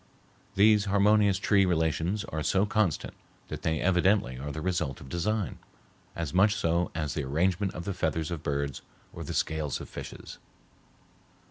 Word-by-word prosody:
These 105 Hz, +1 st, +5 dB
harmonious 100 Hz, 0 st, +4 dB
tree 100 Hz, +1 st, +3 dB
relations 85 Hz, +3 st, 0 dB
are 80 Hz, -, -4 dB
so 95 Hz, +6 st, +2 dB
constant 105 Hz, -6 st, 0 dB, 0.4 s
that -, -, -5 dB
they 80 Hz, -1 st, 0 dB
evidently 90 Hz, -7 st, +2 dB
are 75 Hz, +2 st, -5 dB
the 80 Hz, -, -5 dB
result 85 Hz, -6 st, -2 dB
of 65 Hz, -, -11 dB
design, 100 Hz, +5 st, -1 dB, 0.6 s
as 85 Hz, -3 st, -4 dB
much 100 Hz, +3 st, +4 dB
so 85 Hz, -1 st, +1 dB
as 75 Hz, -3 st, -2 dB
the 75 Hz, -, -2 dB
arrangement 90 Hz, +8 st, 0 dB
of 85 Hz, -, -6 dB
the 100 Hz, -, -2 dB
feathers 80 Hz, -2 st, -1 dB
of 85 Hz, -3 st, -4 dB
birds 70 Hz, -3 st, -2 dB, 0.3 s
or -, -, -6 dB
the -, -, -5 dB
scales 80 Hz, -3 st, -1 dB
of -, -, -8 dB
fishes. -, -, -9 dB
85 Hz, 160 wpm, -28 LUFS, 80-100 Hz, 0.6 s, These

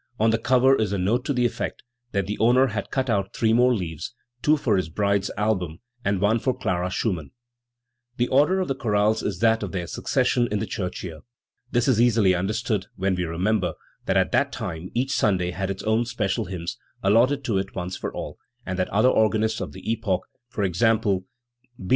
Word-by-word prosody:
On 110 Hz, +1 st, +4 dB
the 115 Hz, -, +1 dB
cover 130 Hz, +3 st, +4 dB
is 110 Hz, -5 st, 0 dB
a -, -, 0 dB
no'te 105 Hz, +7 st, +1 dB
to -, -, 0 dB
the 125 Hz, -3 st, +1 dB
effect 120 Hz, -, -3 dB, 0.3 s
that 100 Hz, -1 st, 0 dB
the 105 Hz, +2 st, -4 dB
owner 125 Hz, +4 st, +5 dB
had 105 Hz, -5 st, -3 dB
cut 130 Hz, -1 st, -1 dB
out 100 Hz, -4 st, -1 dB
three 110 Hz, -1 st, +2 dB
more 125 Hz, +2 st, +5 dB
leaves 85 Hz, +3 st, -5 dB, 0.3 s
two 155 Hz, +1 st, +4 dB
for 115 Hz, -7 st, +1 dB
his 95 Hz, -4 st, -1 dB
bride's 100 Hz, +2 st, 0 dB
album, 95 Hz, -6 st, 0 dB, 0.3 s
and 100 Hz, -4 st, +1 dB
one 105 Hz, +4 st, +2 dB
for 130 Hz, +1 st, 0 dB
Clara 90 Hz, 0 st, -1 dB
Schumann*. 90 Hz, -, -2 dB, 0.9 s
The 120 Hz, -, +2 dB
order 150 Hz, +8 st, +4 dB
of 185 Hz, -, -1 dB
the 135 Hz, -, 0 dB
chorales 110 Hz, -3 st, +1 dB
is 100 Hz, -4 st, -2 dB
that 115 Hz, 0 st, +4 dB
of 100 Hz, -3 st, -5 dB
their 90 Hz, -3 st, -2 dB
succession 120 Hz, +7 st, +1 dB
in 105 Hz, -, 0 dB
the 105 Hz, -, -2 dB
church 95 Hz, -2 st, -4 dB
year. 80 Hz, -4 st, -7 dB, 0.5 s
This 120 Hz, 0 st, +1 dB
is 120 Hz, -4 st, +4 dB
easily 110 Hz, -6 st, +4 dB
understood 100 Hz, +2 st, -1 dB
when 95 Hz, 0 st, 0 dB
we 90 Hz, -1 st, -1 dB
re 85 Hz, 0 st, -5 dB
member 100 Hz, 0 st, +1 dB, 0.3 s
that -, -, +2 dB
at -, -, +2 dB
that -, -, +2 dB
time 85 Hz, 0 st, -5 dB
each 130 Hz, +3 st, 0 dB
Sunday 90 Hz, -7 st, +1 dB
had 95 Hz, +2 st, -3 dB
its 95 Hz, -1 st, -4 dB
own 110 Hz, +2 st, +2 dB
special 110 Hz, -2 st, -1 dB
hymns, 85 Hz, -2 st, -5 dB, 0.2 s
allotted 120 Hz, +8 st, +3 dB
to 110 Hz, -6 st, 0 dB
it 95 Hz, +1 st, -5 dB
once 90 Hz, 0 st, -4 dB
for -, -, -4 dB
all, -, -, -7 dB, 0.3 s
and 95 Hz, -1 st, -3 dB
that 90 Hz, -, 0 dB
other 110 Hz, +5 st, +3 dB
organists 110 Hz, -1 st, +2 dB
of -, -, -4 dB
the -, -, -11 dB
epoch 110 Hz, -5 st, 0 dB, 0.4 s
e. 100 Hz, -, +3 dB
g. 90 Hz, +6 st, +1 dB
B. 100 Hz, -4 st, 0 dB
105 Hz, 210 wpm, -24 LUFS, 95-115 Hz, 0.9 s, owner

